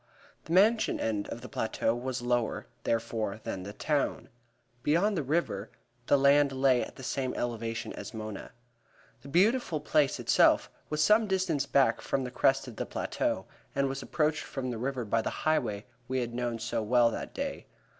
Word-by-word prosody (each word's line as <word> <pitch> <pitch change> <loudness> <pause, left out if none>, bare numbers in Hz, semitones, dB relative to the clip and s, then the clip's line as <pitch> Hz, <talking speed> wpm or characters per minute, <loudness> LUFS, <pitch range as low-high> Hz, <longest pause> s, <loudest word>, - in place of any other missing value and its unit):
The 160 - -4
Mansion 215 +5 +4
end 105 -2 -1
of 120 - -6
the 125 - -8
plateau 115 -3 -1
was 125 +1 -4
lower, 120 -1 0 0.2
therefore, 115 -2 -1
than 95 - -4
the 100 +2 -6
town. 145 +6 -1 0.5
Beyond, 170 - +3
up - - -2
the - - +1
river, 145 -10 0 0.4
the 145 - +5
land 140 +1 +5
lay 130 -2 +3
at - - -9
the 130 - -10
same 130 0 -2
elevation 115 -1 -3
as - - -7
Mona. 110 -2 -7 0.7
The 135 - -12
beautiful 185 - +2
place 150 -1 +2
itself - - +4 0.2
was 155 0 +1
some 215 +4 +5
distance 185 -8 0
back 140 -1 +3
from 135 -1 -1
the 125 - -5
crest 135 +1 +2
of 120 - -9
the - - -2
plateau - - -2 0.3
and 140 0 +2
was 135 0 -3
approached 155 -1 0
from 130 -2 -4
the 115 - -4
river 130 -1 -2
by 115 +2 +1
the - - -2 0.2
highway 120 -10 +1 0.2
we 130 0 0
had 120 -1 -4
known 120 -1 -2
so 115 0 -2
well 120 +2 +4
that - - -6
day. - - -4
130 Hz, 185 wpm, -30 LUFS, 115-150 Hz, 0.7 s, the